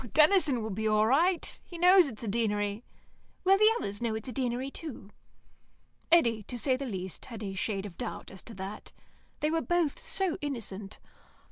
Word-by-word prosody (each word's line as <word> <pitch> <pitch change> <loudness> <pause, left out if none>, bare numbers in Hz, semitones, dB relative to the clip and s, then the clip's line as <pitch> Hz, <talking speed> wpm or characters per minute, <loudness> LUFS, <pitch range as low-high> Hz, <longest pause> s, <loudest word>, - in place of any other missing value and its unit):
"Oh, - - -8
Denison 300 - +4
will 220 - -4
be 220 +3 -1
all 215 0 +3
right. 330 +9 +2
He 345 - -10
knows 360 0 +7
it's 235 -4 -8
a - - -4
Deanery." 210 0 -1 0.6
"Will 385 +1 +5
the 430 +1 +7
others 205 - -3
know 230 -2 -1
it's 220 +2 -6
a - - -4
Deanery, 250 +2 -2
too?" 255 -12 -7 1.0
Eddy, 235 -10 +4
to 245 +4 -7
say 260 +2 +1
the 265 0 -4
truth, 190 -3 -5
had 225 -3 -8
a 195 -1 -4
shade 195 +1 -2
of 190 -4 -10
doubt 245 - -5
as 190 -1 -10
to 225 - -9
that. 195 +2 -7 0.5
They 300 +1 +1
were 325 0 +1
both 345 -4 0
so 380 -2 -1
innocent. 215 -8 -5
235 Hz, 195 wpm, -30 LUFS, 210-310 Hz, 1.0 s, knows